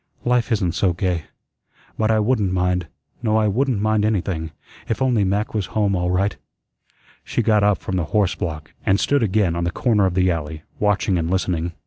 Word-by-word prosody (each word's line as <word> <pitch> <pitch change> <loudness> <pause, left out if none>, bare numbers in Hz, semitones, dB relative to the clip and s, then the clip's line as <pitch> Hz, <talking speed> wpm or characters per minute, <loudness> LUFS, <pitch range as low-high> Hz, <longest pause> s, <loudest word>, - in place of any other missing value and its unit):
"Life 125 0 +1
isn't 100 -6 +1
so 90 +1 +1
gay. 90 -3 -1 0.7
But 110 0 0
I 110 - +3
wouldn't 105 -3 +1
mind, 90 -1 0 0.3
no 110 -2 +1
I 110 -1 +2
wouldn't 125 +2 +1
mind 110 0 +1
anything, 95 -6 -1 0.4
if 110 - -1
only 125 -5 +2
Mac 100 +3 -1
was 105 -4 -1
home 100 -2 +2
all 90 0 0
right." 95 +3 0 0.9
She 120 - -1
got 105 -2 +3
up 105 -1 +3
from 95 - -4
the 85 - 0
horse 100 +1 +1
block 75 -4 -5
and 100 - +2
stood 145 +4 +2
again 100 -5 +1
on 85 - -1
the 85 - 0
corner 105 0 +2
of 90 - -2
the 95 -1 +3
alley, 80 -1 -4 0.2
watching 105 -2 +1
and 80 0 -2
listening. 90 -2 -1
100 Hz, 195 wpm, -21 LUFS, 90-110 Hz, 0.9 s, I